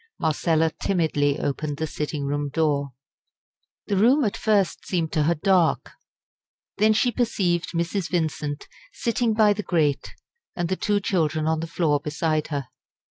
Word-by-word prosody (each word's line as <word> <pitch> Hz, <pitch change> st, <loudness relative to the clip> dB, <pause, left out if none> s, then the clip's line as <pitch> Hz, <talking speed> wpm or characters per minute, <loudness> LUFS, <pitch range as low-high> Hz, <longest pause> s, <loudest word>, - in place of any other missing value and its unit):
Marcella 160 Hz, 0 st, +1 dB
timidly 150 Hz, -6 st, +1 dB
opened 145 Hz, +1 st, -3 dB
the 160 Hz, -, -1 dB
sitting 150 Hz, -1 st, -4 dB
room 145 Hz, +1 st, -2 dB
door. 145 Hz, -3 st, 0 dB, 0.9 s
The 200 Hz, -, -1 dB
room 255 Hz, +9 st, +4 dB
at 205 Hz, -, -1 dB
first 205 Hz, -4 st, +1 dB
seemed 165 Hz, -4 st, -1 dB
to 155 Hz, -3 st, +1 dB
her 170 Hz, +2 st, +2 dB
dark. 180 Hz, +1 st, +2 dB, 0.9 s
Then 215 Hz, +1 st, +4 dB
she 245 Hz, +3 st, +2 dB
perceived 185 Hz, -9 st, 0 dB
Mrs. 170 Hz, +2 st, -1 dB
Vincent 155 Hz, -4 st, -2 dB, 0.2 s
sitting 235 Hz, -, 0 dB
by 215 Hz, -2 st, +5 dB
the 210 Hz, -, -4 dB
grate, 150 Hz, -8 st, 0 dB, 0.4 s
and 175 Hz, -1 st, -2 dB
the 190 Hz, -, +1 dB
two 205 Hz, +1 st, 0 dB
children 155 Hz, -5 st, 0 dB
on 160 Hz, 0 st, +1 dB
the 165 Hz, -, -4 dB
floor 160 Hz, -3 st, +1 dB
beside 155 Hz, +1 st, -1 dB
her. 140 Hz, -4 st, -4 dB
165 Hz, 150 wpm, -24 LUFS, 150-195 Hz, 0.9 s, by